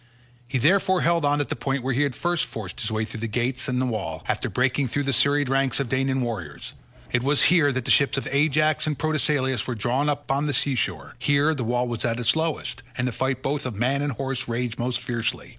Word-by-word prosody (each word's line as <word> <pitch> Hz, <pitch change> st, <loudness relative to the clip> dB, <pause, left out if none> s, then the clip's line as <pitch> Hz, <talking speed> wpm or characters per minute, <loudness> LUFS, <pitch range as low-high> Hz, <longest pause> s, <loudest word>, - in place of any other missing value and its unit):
He 130 Hz, +1 st, -1 dB
therefore 185 Hz, +7 st, +3 dB
held 170 Hz, -1 st, +2 dB
on 145 Hz, 0 st, +2 dB
at 145 Hz, -, -4 dB
the -, -, -1 dB
point 135 Hz, -2 st, -2 dB
where 135 Hz, 0 st, 0 dB
he 130 Hz, -, +1 dB
had 140 Hz, -4 st, 0 dB
first 175 Hz, -1 st, 0 dB
forced 100 Hz, -5 st, -7 dB
his 110 Hz, -, -1 dB
way 110 Hz, 0 st, 0 dB
through 110 Hz, -, -7 dB
the 115 Hz, -, -2 dB
gates 125 Hz, +3 st, -1 dB
and 125 Hz, -1 st, 0 dB
the 130 Hz, -, +1 dB
wall, 100 Hz, -10 st, -3 dB
after -, -, -1 dB
breaking 130 Hz, +2 st, +1 dB
through 145 Hz, +4 st, -1 dB
the 135 Hz, 0 st, 0 dB
serried 145 Hz, +1 st, +3 dB
ranks 135 Hz, 0 st, +1 dB
of 135 Hz, -4 st, -2 dB
Danaan 135 Hz, +1 st, +1 dB
warriors. 100 Hz, -12 st, -4 dB, 0.4 s
It 125 Hz, -, +2 dB
was 140 Hz, +3 st, +2 dB
here 155 Hz, -5 st, +4 dB
that 130 Hz, -2 st, -2 dB
the -, -, +2 dB
ships 140 Hz, -1 st, +4 dB
of 135 Hz, -, -2 dB
Ajax 155 Hz, +2 st, +2 dB
and 150 Hz, -2 st, -1 dB
Protesilaus 145 Hz, -4 st, 0 dB
were 125 Hz, -, -2 dB
drawn 125 Hz, +7 st, 0 dB
up 145 Hz, 0 st, -2 dB
by 135 Hz, +1 st, 0 dB
the 145 Hz, -1 st, 0 dB
sea 135 Hz, +2 st, +2 dB
shore; 90 Hz, -, -3 dB
here 145 Hz, +4 st, +3 dB
the 135 Hz, -5 st, -3 dB
wall 120 Hz, +2 st, 0 dB
was 120 Hz, -2 st, -2 dB
at 115 Hz, -1 st, 0 dB
its 115 Hz, -1 st, +2 dB
lowest, 160 Hz, -4 st, -2 dB, 0.2 s
and 120 Hz, -, 0 dB
the -, -, -1 dB
fight 130 Hz, +2 st, -2 dB
both 145 Hz, +1 st, -1 dB
of 125 Hz, -4 st, -4 dB
man 130 Hz, +6 st, +1 dB
and 145 Hz, -1 st, -1 dB
horse 135 Hz, +1 st, -3 dB
raged 120 Hz, 0 st, -2 dB
most 120 Hz, 0 st, -1 dB
fiercely. 120 Hz, -3 st, -3 dB
130 Hz, 245 wpm, -24 LUFS, 120-145 Hz, 0.4 s, here